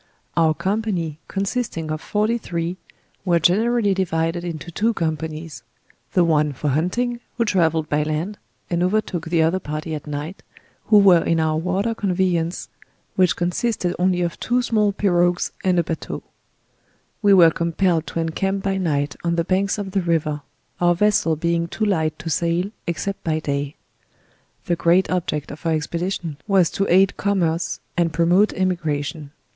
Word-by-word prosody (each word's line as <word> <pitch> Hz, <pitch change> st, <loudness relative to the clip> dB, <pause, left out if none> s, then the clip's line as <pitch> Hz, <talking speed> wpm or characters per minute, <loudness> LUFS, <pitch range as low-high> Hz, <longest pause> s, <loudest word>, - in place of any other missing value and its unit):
Our 160 Hz, -2 st, +3 dB
company, 190 Hz, -6 st, -2 dB
consisting 195 Hz, -5 st, -2 dB
of 155 Hz, 0 st, -3 dB
forty 215 Hz, +3 st, 0 dB
three, 170 Hz, -2 st, -3 dB, 0.5 s
were 175 Hz, -3 st, +3 dB
generally 210 Hz, +5 st, +3 dB
divided 170 Hz, -2 st, -1 dB
into 170 Hz, 0 st, -6 dB
two 220 Hz, +6 st, 0 dB
companies; 160 Hz, -1 st, -3 dB, 0.5 s
the 180 Hz, -, +4 dB
one 150 Hz, -3 st, +2 dB
for 145 Hz, +3 st, -2 dB
hunting, 235 Hz, -, 0 dB, 0.2 s
who 230 Hz, -, +2 dB
trav 175 Hz, -6 st, +2 dB
elled 160 Hz, -1 st, -1 dB
by 150 Hz, +1 st, +1 dB
land, 155 Hz, +7 st, -3 dB, 0.3 s
and 170 Hz, -1 st, -1 dB
overtook 185 Hz, -3 st, 0 dB
the 165 Hz, -1 st, +3 dB
other 165 Hz, +4 st, +2 dB
party 155 Hz, 0 st, -5 dB
at 150 Hz, 0 st, -6 dB
night, 150 Hz, +5 st, -5 dB, 0.4 s
who 215 Hz, -, +5 dB
were 190 Hz, -4 st, +6 dB
in 165 Hz, -, +1 dB
our 155 Hz, -1 st, +1 dB
water 185 Hz, +7 st, 0 dB
conveyance, 180 Hz, -4 st, -1 dB, 0.5 s
which 185 Hz, -3 st, +3 dB
consibtsd 180 Hz, +1 st, -1 dB
only 180 Hz, -1 st, +2 dB
of 170 Hz, -, -3 dB
two 245 Hz, +1 st, +1 dB
small 215 Hz, -3 st, +2 dB
perogues 175 Hz, -3 st, +1 dB
and 185 Hz, -1 st, +2 dB
a 170 Hz, -, +3 dB
batteau. 165 Hz, 0 st, -5 dB, 1.0 s
We 200 Hz, -2 st, +6 dB
were 170 Hz, -3 st, +7 dB
compelled 170 Hz, 0 st, 0 dB
to -, -, -3 dB
en 165 Hz, 0 st, 0 dB
camp 195 Hz, +4 st, -1 dB
by 195 Hz, -1 st, 0 dB
night 145 Hz, -5 st, -1 dB
on 170 Hz, 0 st, +1 dB
the 170 Hz, -, +1 dB
banks 195 Hz, +3 st, 0 dB
of 200 Hz, -2 st, -4 dB
the 195 Hz, 0 st, +1 dB
river; 155 Hz, -4 st, 0 dB, 0.4 s
our 175 Hz, 0 st, +3 dB
vessel 190 Hz, -4 st, +2 dB
being 170 Hz, +1 st, 0 dB
too 215 Hz, +5 st, -2 dB
light 160 Hz, -6 st, 0 dB
to 165 Hz, -, -6 dB
sail 170 Hz, +5 st, 0 dB, 0.2 s
except 195 Hz, +3 st, -3 dB
by 160 Hz, -1 st, 0 dB
day. 145 Hz, -1 st, -3 dB, 0.9 s
The 175 Hz, -, +1 dB
great 170 Hz, +3 st, +3 dB
object 160 Hz, -5 st, -2 dB
of 145 Hz, -, -10 dB
our 165 Hz, -1 st, +1 dB
expedition 170 Hz, 0 st, -3 dB
was 190 Hz, -5 st, +3 dB
to 195 Hz, -, -1 dB
aid 190 Hz, +1 st, +4 dB
Commerce 175 Hz, -5 st, 0 dB, 0.2 s
&nd 170 Hz, -1 st, +1 dB
promote 175 Hz, +6 st, +3 dB
Emigration. 155 Hz, -5 st, -2 dB
175 Hz, 165 wpm, -22 LUFS, 160-195 Hz, 1.0 s, were